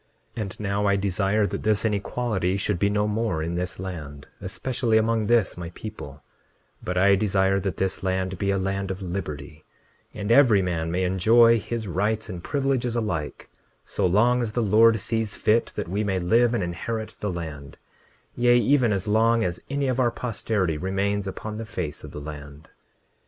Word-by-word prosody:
29:32 115 - -3
And 100 -3 -6
now 100 0 0
I 100 - +3
desire 100 +2 +1
that - - -4
this 110 0 +1
inequality 105 -2 -1
should 100 -2 -1
be 100 - +2
no 105 0 +1
more 105 -7 -1
in 85 +1 -3
this 90 +2 -3
land, 75 -7 -7
especially 115 +4 0
among 110 -1 +1
this 115 -5 +2
my 85 -1 -6
people; 75 -10 -9 0.6
but 90 0 -3
I 100 +2 +5
desire 95 -1 +2
that 95 -1 -3
this 95 0 -1
land 95 -1 -2
be 100 - 0
a 100 - +2
land 95 0 -2
of 95 0 -5
liberty, 80 -4 -6 0.5
and 105 +1 -3
every 120 -5 +6
man 85 -2 -2
may 90 +2 0
enjoy 115 +6 +5
his 115 0 -4
rights 105 +5 -1
and 85 -2 -6
privileges 135 -4 0
alike, 85 -10 -3 0.3
so - - 0
long 120 +7 +3
as 110 -3 -3
the 120 - 0
Lord 110 +2 +5
sees 110 +1 -2
fit 115 +2 +2
that 105 - -3
we 100 +5 -1
may 95 -2 0
live 115 +7 +3
and 105 - 0
inherit 110 +6 -4
the 105 - -2
land, 75 -5 -7 0.6
yea, 120 0 +4
even 120 0 +3
as 100 -1 -1
long 115 +2 +3
as 90 -3 -2
any 140 0 -1
of 130 0 0
our 125 -2 +4
posterity 105 -8 -2
remains 100 +2 -1
upon 105 +3 -6
the - - -4
face 80 -8 -5
of - - -8
the - - -8
land. 75 0 -10
100 Hz, 185 wpm, -25 LUFS, 90-115 Hz, 0.6 s, every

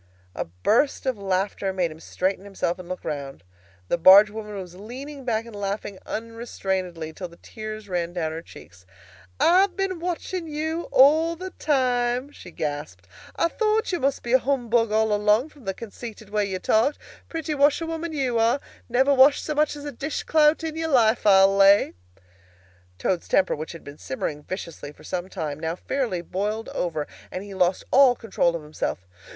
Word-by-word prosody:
A - - -3
burst 210 - +1
of 255 -5 -1
laughter 195 0 -1
made 180 -3 -1
him 155 - -11
straighten 185 +3 -2
himself 195 -3 -2
and 180 -1 -10
look 185 - -6
round. 140 - -5 0.4
The 175 - 0
barge 195 +5 +8
woman 210 -1 -7
was 185 -3 -7
leaning 260 +8 -9
back 225 -2 0
and 230 -2 -11
laughing 200 -1 -4
unrestrainedly, 190 -8 -4
till 180 - -6
the 170 0 -17
tears 215 -1 -8
ran 175 -2 -2
down 165 -3 -2
her 160 +1 -5
cheeks. 95 - -15 0.5
"I've 370 +2 +4
been 385 -3 -1
watching 350 0 -3
you 315 +2 -3
all 315 +5 +5
the 370 +2 -7
time," 250 -3 0
she 235 - -12
gasped. 145 - -5 0.3
"I - - +2
thought 435 +4 0
you 350 - -1
must 275 0 0
be 240 - -2
a 260 - +7
humbug 240 -4 +1
all 220 0 +2
along, 210 +7 +3
from 285 -6 -18
the 195 - -1
conceited 220 -1 -9
way 210 -1 +1
you 190 -1 -3
talked. 225 +9 +2 0.3
Pretty 320 -2 -3
washerwoman 325 +3 +1
you 260 -6 0
are! 230 +4 +3 0.3
Never 265 +4 +3
washed 275 +2 +5
so 305 - -1
much 300 0 +1
as 290 0 -9
a 290 - -4
dish 280 +4 -4
clout 310 +1 +3
in 320 -1 -3
your 325 0 -2
life, 235 -5 +3
I'll 195 0 +6
lay!" 200 +1 +5 1.0
Toad's 170 - -1
temper 190 - +2
which 155 +3 -6
had 165 - -11
been 145 +1 -11
simmering 145 +3 -4
viciously 165 -4 -7
for - - -18
some 180 +1 -4
time, 155 -6 -4
now 160 +1 -2
fairly 210 -5 -2
boiled 210 +5 -3
over, 155 -4 -2 0.3
and 185 - -5
he 200 -1 -9
lost 185 -1 +1
all 265 -2 +6
control 190 -7 0
of 165 - -5
himself. 150 -11 -4
215 Hz, 180 wpm, -24 LUFS, 180-280 Hz, 1.0 s, barge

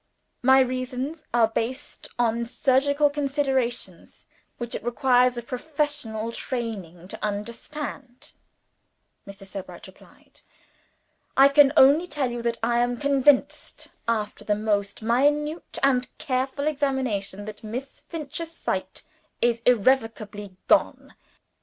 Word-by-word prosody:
"My 265 +1 +6
reasons 255 +4 -3
are 235 -2 +4
based 235 +5 -4
on 235 -1 +1
surgical 285 +4 +2
considerations 270 - -2 0.3
which 240 -1 -6
it - - -4
requires 250 0 +3
a 240 - -4
professional 255 -4 -3
training 200 -10 -5
to - - -9
understand," 240 +5 -6 0.9
Mr. 195 0 -11
Sebright 195 -1 -9
replied. - - -18 1.0
"I 270 +1 +8
can 280 -1 +6
only 290 +7 +6
tell 285 -6 -1
you 240 0 -4
that 235 0 -1
I 235 +1 +2
am 245 0 +1
convinced 280 +1 +2 0.2
after 215 -2 -2
the 210 - +1
most 205 0 -1
minute 295 +7 +1
and 255 -2 +3
careful 265 0 -2
examination 260 -9 -1
that 215 0 -9
Miss 250 +5 -6
Finch's 325 +1 -6
sight - - -4 0.4
is 235 -1 +1
irrevocably 215 -5 +1
gone. - - +2
250 Hz, 115 wpm, -25 LUFS, 225-280 Hz, 1.0 s, I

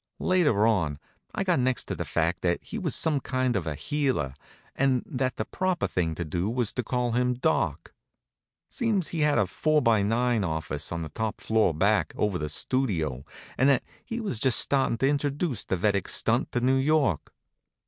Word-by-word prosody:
Later 150 - +2
on 85 -10 +1 0.4
I - - 0
got 180 -6 +2
next 130 0 +1
to - - -5
the - - -4
fact 85 +2 0
that 85 -1 0
he 225 - -6
was 165 -8 -1
some 155 -3 +1
kind 130 -2 -1
of 90 -5 -1
a 75 - -2
healer, 135 - -1 0.4
and 130 -2 +2
that 130 0 -2
the - - -2
proper 185 -2 -1
thing 80 -3 -1
to 85 - -4
do 85 +6 -2
was 120 -2 -1
to 125 - -2
call 125 +1 -1
him 125 +1 +1
Doc. 160 +6 -1 0.7
Seems 220 - -1
he 165 - -4
had 150 -1 +3
a - - +3
four 155 - +1
by 115 -6 +3
nine 115 +1 +1
office 80 -3 -3
on 85 -1 -3
the 80 - -6
top 110 +7 -3
floor 110 -4 +2
back, 100 +7 +1
over 100 -4 0
the 75 -1 -3
Studio, 80 - -1 0.3
and 130 +3 +5
that 135 -3 +3 0.2
he 230 - -5
was 200 - -2
just 130 -1 +4
startin' 135 -4 +2
to 135 - +2
introduce 145 - -1
the 95 - -2
Vedic 100 +1 +1
stunt - - +1
to 120 - 0
New 130 +2 +3
York. 140 - +1
120 Hz, 195 wpm, -27 LUFS, 90-140 Hz, 0.7 s, and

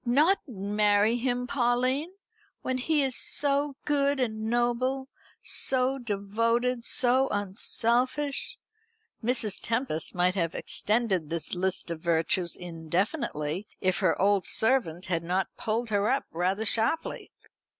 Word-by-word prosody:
"Not 300 +11 +3
marry 210 0 +2
him, 245 0 -1
Pauline, 255 +6 0 0.5
when 255 0 -1
he 295 +2 +2
is 265 -2 0
so 285 0 0
good 285 -1 +2
and 220 -3 -2
noble, 240 +3 0 0.3
so 260 +1 +1
devoted, 230 +3 0
so 260 +1 +4
unselfish!" 250 - 0 0.7
Mrs. 225 -4 0
Tempest 225 - -2
might 180 +1 +2
have 170 -4 -1
extended 210 -8 0
this 165 -1 -2
list 185 -1 -1
of 165 - -4
virtues 170 +1 0
indefinitely, 170 - -3
if 185 -1 +1
her - - +1
old 200 0 +2
servant 220 -8 +1
had 170 -3 -1
not 180 +2 -1
pulled 225 +1 -1
her 205 +1 +2
up 270 +2 +1
rather 185 +6 -1
sharply. 230 +9 0
230 Hz, 120 wpm, -28 LUFS, 190-260 Hz, 0.7 s, so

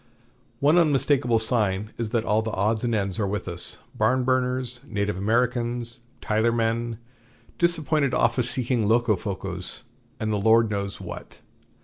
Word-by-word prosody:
One 150 +5 +4
unmistakable 140 -6 +2
sign 110 -3 0
is 115 -2 -2
that 115 0 -1
all 105 +1 +2
the 110 - -3
odds 110 +3 0
and 120 -2 0
ends 100 -2 -1
are 100 - 0
with 105 0 -3
us 85 -1 0 0.2
Barnburners, 125 -1 +1
Native 100 -2 -2
Americans, 120 +3 -1 0.2
Tyler 110 +2 +1
men, 115 0 -1 0.6
disappointed 155 -5 +2
office 125 -2 +2
seeking 125 -4 0
Locofocos, 110 -4 -1 0.4
and 110 0 -1
the - - +1
Lord 110 +2 +4
knows 100 -1 -3
what. - - -9
115 Hz, 135 wpm, -25 LUFS, 105-125 Hz, 0.6 s, One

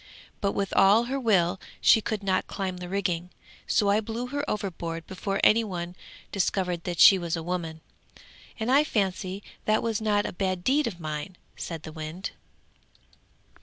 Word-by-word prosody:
But 200 -2 +1
with 200 -1 -2
all 200 +4 +6
her 265 +3 -2
will 190 -6 +2 0.2
she 220 - +6
could 215 -2 -3
not 190 -1 +1
climb 190 -2 -3
the 180 0 -7
rigging; 180 -3 -1 0.4
so 205 - +2
I 205 - +4
blew 230 +3 -4
her 285 +2 -2
overboard 170 -5 -3
before 195 +2 -3
any 230 +2 +6
one 175 -4 -5 0.4
discovered 180 -3 -1
that 175 -1 -3
she 195 -2 +9
was 170 -1 -2
a 165 - -4
woman, 165 -2 -4 0.8
and 225 +3 0
I 280 +3 +6
fancy 195 -5 -1 0.2
that 215 0 +2
was 225 -2 -1
not 205 -1 +2
a - - -4
bad 185 -1 -1
deed 280 +4 +3
of 185 -6 -5
mine!' 155 +3 -5 0.2
said 165 -2 -6
the 155 - -7
wind. 160 +4 -5
190 Hz, 170 wpm, -27 LUFS, 175-215 Hz, 0.8 s, she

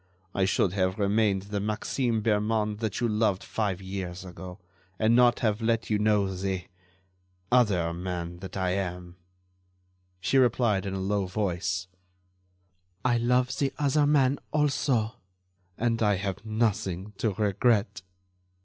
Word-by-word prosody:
I 95 - +2
should 95 -1 +1
have 95 -1 0
remained 100 -1 +2
the 100 0 -3
Maxime 110 +2 -1
Bermond 105 -1 +1
that 110 -2 -2
you 120 - +1
loved 105 -3 +1
five 100 -4 -2
years 95 -1 -5
ago, 90 0 -9 0.4
and 110 +4 +3
not 120 -1 +4
have 110 -1 +1
let 115 0 0
you 105 - +2
know 105 -2 +2
the... 95 -1 -2 0.9
other 100 -9 +3
man 85 -1 -4
that 95 +1 -7
I 95 -1 0
am." 90 -2 -4 1.0
She 95 +9 +2
replied 115 -5 +2
in 95 - -3
a - - -3
low 100 0 0
voice: 90 -1 -1 1.2
"I 120 -1 +3
love 125 +2 +2
the 140 -2 +1
other 145 +1 +2
man, 140 -2 +3
also, 135 -7 +1 0.6
and 115 -1 0
I 105 -2 +3
have 100 +1 -4
nothing 105 -3 -1
to 110 -3 +1
regret." 105 -1 +1
105 Hz, 140 wpm, -27 LUFS, 95-115 Hz, 1.2 s, not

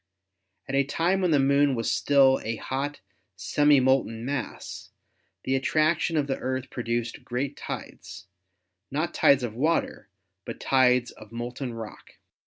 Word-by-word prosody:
At 135 - -5
a 140 0 +3
time 170 +7 0
when 180 - +2
the 155 - +4
Moon 140 0 +3
was 115 -1 -1
still 135 -2 +4
a 115 +1 -2
hot, 140 +4 -4 0.3
semi 145 -1 +3
molten 125 -3 +1
mass, 140 -1 -5 0.5
the 130 - -1
attraction 155 +4 +1
of 145 - +2
the 135 -1 -3
Earth 130 0 -3
produced 120 -1 -3
great 135 +3 -3
tides, - - -8 0.6
not - - -2
tides 140 -2 +4
of 115 -3 -3
water, 155 +2 -1 0.3
but - - -7
tides 125 -2 +3
of 110 0 -15
molten 120 +1 -5
rock. 110 -3 -10
135 Hz, 145 wpm, -26 LUFS, 120-145 Hz, 0.6 s, the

